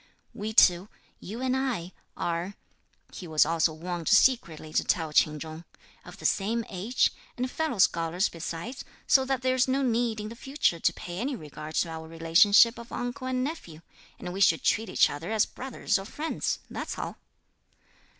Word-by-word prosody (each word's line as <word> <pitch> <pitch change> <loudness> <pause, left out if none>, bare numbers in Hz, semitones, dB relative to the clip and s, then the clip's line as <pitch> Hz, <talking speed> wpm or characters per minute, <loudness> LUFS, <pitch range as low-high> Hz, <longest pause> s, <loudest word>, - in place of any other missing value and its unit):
"We 215 +2 -4
two, 185 -2 +5 0.3
you 225 +6 -7
and 260 0 +1
I, 245 -10 -2 0.3
are," 175 +3 -2 0.6
he 180 - -8
was 155 -2 +4
also 165 +1 +2
wont 170 +1 -4
secretly 190 -9 +3
to - - +2
tell 160 -3 0
Ch'in 150 0 +3
Chung, 160 +2 -8 0.4
"of - - -12
the - - -10
same 220 +3 +1
age, 200 +7 +1 0.3
and 250 +1 -2
fellow 315 -7 -2
scholars 170 0 +2
besides, 170 - -6 0.2
so 265 -1 +4
that 265 -1 -1
there's 255 0 +2
no 270 +1 +1
need 235 -2 0
in 210 0 -5
the 230 - -9
future 265 - 0
to - - +2
pay 175 +1 -7
any 265 +4 -2
regard 155 -3 -9
to 170 - +1
our 160 0 -7
relationship 170 +8 +5
of 235 - -11
uncle 245 +1 -4
and 255 0 0
nephew; 255 - -6 0.4
and 180 - -6
we 195 - -4
should 165 -4 +4
treat 220 +1 +1
each - - +4
other 155 +8 -6
as 220 -1 +3
brothers 250 -5 -2
or 195 - -7
friends, 305 +9 -3
that's - - -5
all." - - -5
205 Hz, 180 wpm, -27 LUFS, 165-250 Hz, 0.6 s, two